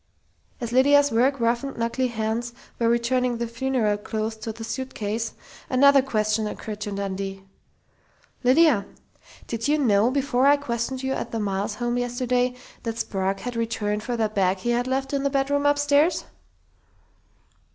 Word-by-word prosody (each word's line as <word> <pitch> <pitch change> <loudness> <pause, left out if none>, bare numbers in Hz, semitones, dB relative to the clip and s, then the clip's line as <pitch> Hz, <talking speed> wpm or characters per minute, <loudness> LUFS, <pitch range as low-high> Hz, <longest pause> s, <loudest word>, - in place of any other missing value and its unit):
As 235 -3 -4
Lydia's 285 +3 +5
work 255 +4 +2
roughened, 235 +4 0
knuckly 235 +3 0
hands 230 +1 -2 0.3
were 230 -1 +2
returning 240 +1 +1
the 235 - -2
funeral 230 -3 0
clothes 220 +1 -3
to 220 +1 -5
the 225 +1 -9
suitcase, 230 -2 -3 0.4
another 275 +1 +6
question 215 -4 0
occurred 210 0 -6
to 205 - -3
Dundee: 195 -1 -4 1.0
"Lydia, 255 -5 +4 0.6
did 230 +1 -3
you 300 +1 +3
know, 225 -5 +3
before 270 -1 +2
I 290 +1 +6
questioned 255 -1 -3
you 265 0 0
at - - -4
the 225 - -3
Miles 200 0 -2
home 240 +1 -1
yesterday, 245 0 0 0.3
that 230 -1 -4
Sprague 195 -2 -2
had 245 +2 -5
returned 215 -2 -1
for 240 +2 -3
that 215 -1 0
bag 190 -1 +2
he 240 +6 -2
had 240 +1 0
left 270 +1 -1
in 280 - +1
the 280 - +1
bedroom 285 +1 +1
upstairs?" 290 +3 +3
235 Hz, 155 wpm, -24 LUFS, 215-265 Hz, 1.0 s, another